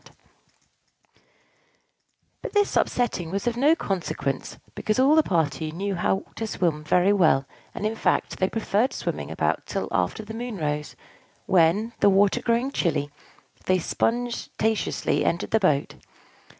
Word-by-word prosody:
But - - -6
this 410 -1 +2
upsetting 215 -9 0
was 195 +5 -3
of 240 -1 0
no 290 +6 +4
consequence, 165 - -3 0.2
because 215 - -1
all 265 +3 +5
the 315 - +6
party 160 - -1
knew 195 +5 -3
how 190 +2 0
to 225 - -3
swim 165 -7 -1
very 180 +5 +3
well: 160 -9 +3 0.3
and, - - -4
in 220 +1 -1
fact, - - 0
they 185 - +2
preferred 225 +2 0
swimming 75 -1 -4
about 80 -1 -1
till - - -3
after 95 - -1
the 220 - -8
moon 235 -1 -5
rose; 150 -2 -3 0.5
when, 190 +6 +3
the 205 - +5
water 195 0 +3
growing 235 +3 +1
chilly, 145 - -1 0.6
they 185 - +4
sponge 240 +7 -1
taneously 220 0 0
entered 170 - -1
the 220 - +4
boat. 150 -8 +1
195 Hz, 145 wpm, -25 LUFS, 160-225 Hz, 0.6 s, the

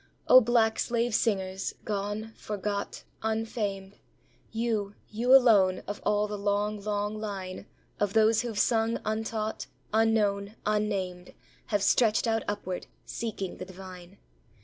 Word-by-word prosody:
O 255 - +9
black 225 -1 +2
slave 235 0 0
singers, 195 -4 0
gone, 210 +2 -3
forgot, 205 -1 -4 0.2
unfamed, 215 -3 -3 0.5
You 220 -3 -1 0.2
you 235 +4 0
alone, 205 -8 +5
of 205 +1 -6
all 210 0 +2
the 210 -1 -5
long, 205 +1 0
long 210 0 -2
line 190 -3 -5 0.3
Of 205 -1 0
those 220 0 +4
who've 235 -4 -5
sung 225 +1 +2
untaught, 220 0 -2 0.3
unknown, 215 -2 +2
unnamed, 200 -4 -1 0.3
Have 205 -2 0
stretched 220 +1 +3
out 225 -1 +1
upward, 185 -3 -4 0.2
seeking 210 -5 -4
the 185 - -6
divine. 185 0 -11
210 Hz, 125 wpm, -28 LUFS, 200-225 Hz, 0.5 s, O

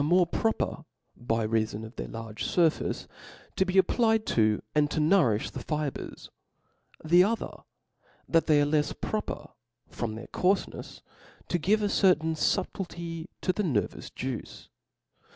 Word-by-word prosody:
Z'z.' 145 - +1
^^^ 175 - +5
^ovc 175 -2 +2
proper 220 -7 -1 0.3
by 115 -2 -1
rcafon 110 0 -1
of 110 - -12
their - - -5
large 115 -1 -6
furface, 165 -3 +1 0.5
to 190 - +2
be 185 +1 0
applied 220 +3 +3
to, 110 -2 +2
and 150 -1 +3
to - - -1
nourifli, 150 - +3
the - - -6
fibres: 150 -3 -4 0.7
the 175 +3 +6
other, 225 +4 -1 0.8
that 165 -1 +3
they 150 -2 +5
are 145 - +4
lefs 150 0 0
proper, 215 - -3 0.4
from 110 -2 -3
their 110 - -7
coarfe 190 +2 +1
jiefs, - - -10 0.5
to 175 - +1
give 210 +6 +2
a - - +3
certain 165 -5 +3
fubtiity 170 +1 -2
to 185 - +1
the 210 - -1
nervous 130 - -1
juice. 130 -3 -6
160 Hz, 150 wpm, -28 LUFS, 120-185 Hz, 0.8 s, the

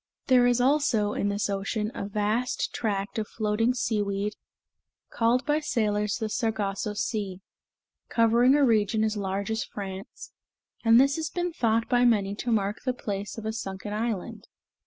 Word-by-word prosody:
There 250 -2 +5
is, 245 0 +3
also, 245 -6 +2
in 205 - 0
this 205 +1 -1
ocean 205 +2 -2
a 200 - -4
vast 215 +4 -1
tract 205 0 -2
of 215 - -3
floating 225 +3 0
seaweed, 205 -3 -1 0.8
called 240 +3 +2
by 295 +1 +2
sailors 210 -7 0
the 220 - -2
Sargasso 210 -3 -2
Sea, 205 -3 -2 0.7
covering 235 +3 +4
a 290 -1 +4
region 220 -2 +2
as 220 0 0
large 200 +1 -2
as 220 - -1
France, 195 -1 -8 0.5
and 230 0 +6
this 275 +3 +3
has 315 -1 -2
been 350 0 -2
thought 225 -4 +1
by 245 -1 +3
many 205 -5 +3
to 240 - -2
mark 205 -1 0
the 255 - 0
place 205 -3 -5
of 220 - -6
a 220 - -2
sunken 200 -1 -5
island. 215 -3 -3
220 Hz, 160 wpm, -27 LUFS, 205-240 Hz, 0.8 s, and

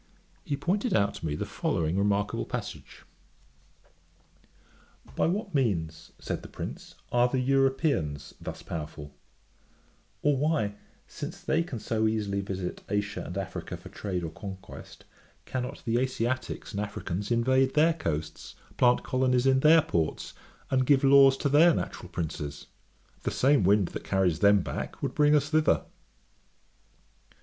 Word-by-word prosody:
He 140 - -2
pointed 195 - 0
out 100 -1 +2
to - - -7
me 75 - -2
the - - -3
following 80 +1 -1
remarkable 100 +1 0
passage: - - -7 2.1
'By - - +2
what 195 +2 -2
means 85 - -1
(said - - -4
the - - -10
prince) - - -8 0.2
are 120 0 +4
the 130 +1 -1
Europeans 135 - +1
thus - - -7
powerful; 75 -2 -7 1.1
or 145 -1 +3
why, 140 -7 0 0.3
since - - -7
they 160 - +1
can 165 -7 -5
so 110 0 0
easily 105 -2 -1
visit 95 -2 -5
Asia 105 0 -1
and 90 - -6
Africa 95 -2 -5
for - - -12
trade 90 -4 -4
or 80 - -4
conquest, 95 +2 -10 0.4
cannot 125 -1 -4
the 115 0 +1
Asiaticks 130 0 -2
and 100 - -4
Africans 105 -2 -4
invade 130 +3 +2
their 160 +2 +5
coasts, 80 - -4 0.2
plant 125 0 +4
colonies 130 -1 +1
in 135 0 +4
their 155 +3 +6
ports, 85 - -2 0.4
and 130 -1 +2
give 140 -2 +4
laws 135 0 +7
to - - 0
their 155 +4 +6
natural 90 - -5
princes? 75 -4 -5 0.6
The - - -1
same 135 -3 +3
wind 100 -1 +3
that - - -7
carries 90 -4 +1
them 100 0 +5
back - - -6
would - - -1
bring 150 0 +4
us 145 0 +2
thither.' 155 -1 +3
115 Hz, 145 wpm, -28 LUFS, 95-135 Hz, 2.1 s, laws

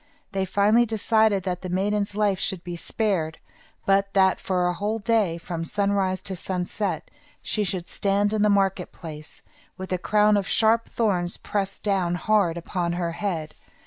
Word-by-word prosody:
They 195 -1 -1
finally 210 +5 +3
decided 220 -2 +2
that 180 -1 -3
the 185 - -5
maiden's 200 +2 0
life 205 -3 +1
should 185 -2 -2
be 175 -1 -5
spared, 170 -4 -1 0.5
but 195 0 +2
that 190 -1 +4
for 180 -2 0
a 180 - +1
whole 210 +4 -2
day, 210 -5 +1
from 170 -1 -5
sunrise 200 0 0
to 190 - -3
sunset, 185 +2 -3 0.3
she 215 - 0
should 180 -2 -3
stand 200 +1 +1
in 215 - +1
the 210 - +4
market 195 -2 +1
place, 155 -2 -8 0.3
with 190 0 -7
a 185 - 0
crown 210 +2 +3
of 200 - -1
sharp 225 +1 +3
thorns 185 -6 0
pressed 195 -2 -3
down 190 -4 +1
hard 180 -2 +2
upon 170 0 -2
her 175 -1 -1
head. 165 -4 -3
195 Hz, 170 wpm, -25 LUFS, 180-210 Hz, 0.5 s, that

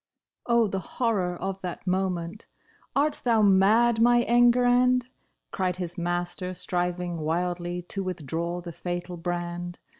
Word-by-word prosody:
Oh, 235 -1 +4
the 195 -1 -2 0.2
horror 195 -8 0
of 195 0 -4
that 180 -1 -6
moment! 185 0 -2 0.2
" - - -34
Art 290 +2 +1
thou 230 -3 +3
mad 215 +4 +4
my 240 0 +5
Enguerrand 245 +1 +4
} - - -35
" - - -50
Cried 185 -2 -1
his 175 -2 -5
master, 175 +1 -2
striving 175 -1 -1
wildly 175 +2 -2
to 195 +3 -4
withdraw 170 0 -3
the 170 -1 -7
fatal 175 +1 -5
brand. 175 0 -4
180 Hz, 145 wpm, -26 LUFS, 175-225 Hz, 0.2 s, my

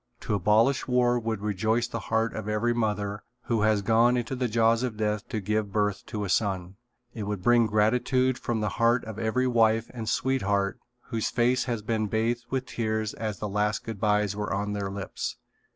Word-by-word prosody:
To 110 - -2
abolish 105 +7 +3
war 125 -1 +3
would 110 -3 -3
rejoice 110 +3 0
the 115 -1 -4
heart 110 0 +1
of 110 -1 -5
every 110 +3 +1
mother 105 -3 -1 0.2
who 115 -3 0
has 105 -1 +2
gone 115 +4 +4
into 120 +2 -2
the 125 -1 0
jaws 115 +1 +3
of 125 -4 -3
death 105 0 -1
to 110 - -2
give 105 +1 -1
birth 105 -1 0
to 105 -3 -3
a - - -3
son. 95 -2 -1 0.4
It 110 - -6
would 105 -3 -3
bring 120 0 +5
gratitude 125 +4 +2
from 115 -4 -2
the 105 - 0
heart 120 +1 +3
of 110 -1 -7
every 115 +3 +1
wife 115 -2 +2
and 115 -3 -4
sweetheart 100 -7 0 0.3
whose 115 -2 0
face 125 +1 +2
has 115 -4 -3
been 110 -1 0
bathed 115 +3 -1
with 130 -1 -1
tears 110 -2 -2
as 110 -3 -4
the 105 - -4
last 105 +1 0
good 115 -3 -6
bys 105 -1 +2
were 105 0 -3
on 105 +1 -1
their 100 -1 -2
lips. 100 -1 -5
110 Hz, 200 wpm, -27 LUFS, 105-120 Hz, 0.4 s, bring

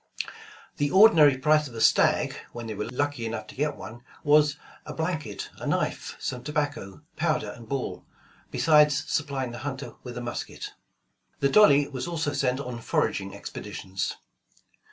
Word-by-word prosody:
The 145 0 +1
ordinary 165 -8 +7
price 150 +2 +3
of 120 - -12
a - - -5
stag, - - +4 0.2
when 120 -1 -6
they 110 - -4
were 105 +2 -4
lucky 145 0 -2
enough 115 - -4
to - - -13
get 150 +1 -1
one, 115 +2 -9 0.2
was 150 0 +4 0.3
a - - -12
"a 150 - -6
blanket, 155 - -3
a - - -5
knife, - - -1
some 125 -1 -4
tobacco, 145 -7 -3
powder 155 -10 0
and 115 0 -12
ball, 135 -2 -3 0.5
besides 150 -3 +4
supplying 140 -4 -1
the 120 - -7
hunter 140 0 -5
with 120 -1 -8
a - - -4
musket." 120 0 -6 0.7
The 140 - +3
Dolly 145 -7 +6
was 130 -2 -5
also 160 -4 -2
sent 135 -2 0
on 125 -3 -5
foraging - - -1
expeditions. 95 0 -5
140 Hz, 160 wpm, -27 LUFS, 120-150 Hz, 0.7 s, ordinary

